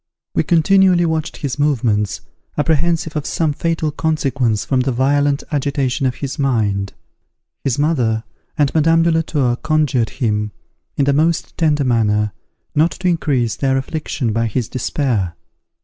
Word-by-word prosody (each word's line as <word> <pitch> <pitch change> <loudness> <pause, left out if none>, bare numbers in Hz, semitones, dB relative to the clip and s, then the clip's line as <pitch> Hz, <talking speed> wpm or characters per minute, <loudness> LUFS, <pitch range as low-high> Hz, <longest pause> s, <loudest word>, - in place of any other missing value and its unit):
We - - +2
continually 180 +1 +4
watched 160 0 -2
his 140 -2 -4
movements, 115 -9 +1 0.4
apprehensive 160 +1 +1
of 150 -2 -2
some 160 -3 0
fatal 165 0 -1
consequence 135 -8 0
from 130 - +1
the 130 +1 +1
violent 140 +3 +1
agitation 140 -2 0
of 125 - -2
his 140 0 -5
mind. 105 -8 0 0.7
His 135 -4 0
mother 125 -8 +1 0.3
and 145 -3 +2
Madame 165 +1 +4
de 170 - +3
la 165 0 +2
Tour 130 -7 0
conjured 150 -7 +1
him, 105 -3 -1 0.4
in 140 - +2
the 140 - +3
most 160 +3 +1
tender 150 -3 +2
manner, 105 -4 +1 0.4
not 155 +3 +3
to 185 - -3
increase 140 -9 0
their 135 -1 +1
affliction 135 -4 -2
by 115 +1 +1
his 115 +1 -2
despair. 115 - -1
140 Hz, 150 wpm, -18 LUFS, 120-155 Hz, 0.7 s, continually